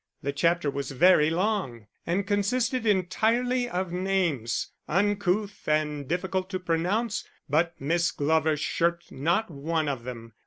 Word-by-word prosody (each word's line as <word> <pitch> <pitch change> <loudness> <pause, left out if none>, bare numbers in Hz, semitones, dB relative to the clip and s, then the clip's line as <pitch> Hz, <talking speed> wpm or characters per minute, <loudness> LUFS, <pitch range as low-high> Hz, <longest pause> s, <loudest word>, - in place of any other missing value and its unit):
The 140 - -1
chapter 165 0 +1
was 140 -1 -4
very 150 +2 +5
long, 175 - -1 0.2
and 185 +4 0
consisted 230 +4 0
entirely 230 +6 +1
of 180 0 -2
names, 180 -10 -1 0.2
uncouth 205 +2 0
and 150 -2 0
difficult 185 +3 -2
to 185 -2 -3
pronounce; 185 +7 0 0.2
but 165 +4 +1
Miss 165 +5 +1
Glover 155 +1 +1
shirked 170 +3 -1
not 170 +9 0
one 155 +2 -1
of 135 -4 -3
them. 115 -2 -8
175 Hz, 130 wpm, -27 LUFS, 150-200 Hz, 0.2 s, very